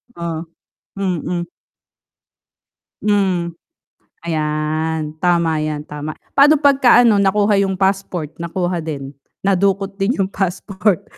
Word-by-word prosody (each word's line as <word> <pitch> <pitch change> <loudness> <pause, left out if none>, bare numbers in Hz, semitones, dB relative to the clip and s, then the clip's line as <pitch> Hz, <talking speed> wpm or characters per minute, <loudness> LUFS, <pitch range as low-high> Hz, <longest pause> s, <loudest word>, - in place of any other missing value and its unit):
Oh? 170 -1 -4 0.5
Mm. 180 -2 -2 1.6
Hmm. 185 -5 +1 0.7
Ayan, 155 0 -1
tama 170 -3 +2
'yan, 155 -1 -3
tama. 150 +1 -5 0.2
Paano 290 +2 +6
'pagka 270 -4 +5
nakuha 205 -1 +3
yung 190 0 -1
passport? 190 -5 -1
Nakuha 175 0 -2
din? 140 -3 -6 0.3
Nadukot 195 0 +1
din 200 +6 +1
yung 190 0 +1
passport. 190 0 -1
180 Hz, 95 wpm, -19 LUFS, 160-195 Hz, 1.6 s, Paano